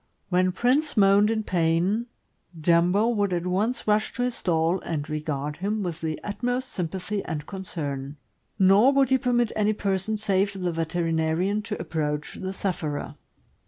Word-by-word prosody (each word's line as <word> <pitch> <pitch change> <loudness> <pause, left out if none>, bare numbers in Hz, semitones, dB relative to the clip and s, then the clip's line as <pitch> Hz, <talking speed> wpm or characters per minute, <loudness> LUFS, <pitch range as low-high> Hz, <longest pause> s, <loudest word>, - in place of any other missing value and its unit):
When 185 0 +2
Prince 260 - +1
moaned 200 +1 +5
in 220 -1 0
pain, 180 +6 +1 0.5
Jumbo 175 +7 +3
would 205 -4 +1
at 175 0 -1
once 210 +7 0
rush 215 0 +2
to 245 - -2
his 250 0 0
stall 170 -2 +1
and 155 -4 -4
regard 150 -1 -3
him 205 +3 -2
with 175 -2 -4
the 160 -1 -3
utmost 245 +5 -2
sympathy 190 +3 -3
and 150 -3 -4
concern; 145 -7 -5 0.4
nor 200 +6 +6
would 270 -2 +3
he 265 - +4
permit 240 -3 +1
any 215 0 +2
person 200 +1 -1
save 200 -1 +1
the 180 -1 -1
veterinarian 165 +4 0
to 205 - -5
approach 150 -2 -3
the 190 0 -3
sufferer. 175 -7 -3
190 Hz, 155 wpm, -25 LUFS, 165-215 Hz, 0.5 s, nor